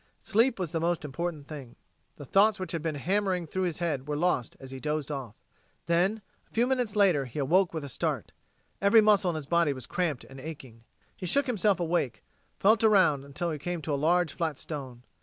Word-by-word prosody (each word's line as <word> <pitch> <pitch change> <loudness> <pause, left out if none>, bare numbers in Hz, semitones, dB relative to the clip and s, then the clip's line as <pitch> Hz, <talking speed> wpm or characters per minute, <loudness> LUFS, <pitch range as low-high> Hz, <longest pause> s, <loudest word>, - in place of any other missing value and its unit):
Sleep 230 +4 +2
was 180 -5 -3
the 165 - -1
most 170 -1 0
important 150 0 -4
thing. 140 -6 -9 0.4
The 145 - -10
thoughts 205 +8 +4
which 185 - -4
had 165 - -2
been 160 -1 -2
hammering 185 +3 0
through 185 +4 -2
his 170 -4 -2
head 150 -6 -2
were 150 - -1
lost 155 -6 0
as 135 -1 -10
he 135 - -7
dozed 150 0 -2
off. 130 -7 -5 0.5
Then, 185 +6 +1 0.2
a - - -35
few 235 +2 +2
minutes 250 -5 0
later, 185 -9 +4
he 125 +3 -10
awoke 170 +7 +3
with 160 -3 -4
a - - -5
start. 130 - -3 0.5
Every 200 +3 +6
muscle 210 -3 +4
in 170 - -2
his 155 -2 -4
body 170 -1 +2
was 130 -3 -7
cramped 165 -8 -2
and 135 0 -12
aching. 130 -6 -9 0.3
He 180 - -6
shook 280 +11 +2
himself 210 -6 +1
awake, 170 -7 -1 0.3
felt 215 +2 +4
around 185 -10 +4
until 145 +5 -3
he 155 - -4
came 175 +3 -3
to 150 - -2
a 140 +2 -1
large 175 0 +3
flat 160 -4 -2
stone. 130 -6 -7
165 Hz, 215 wpm, -28 LUFS, 145-190 Hz, 0.5 s, Every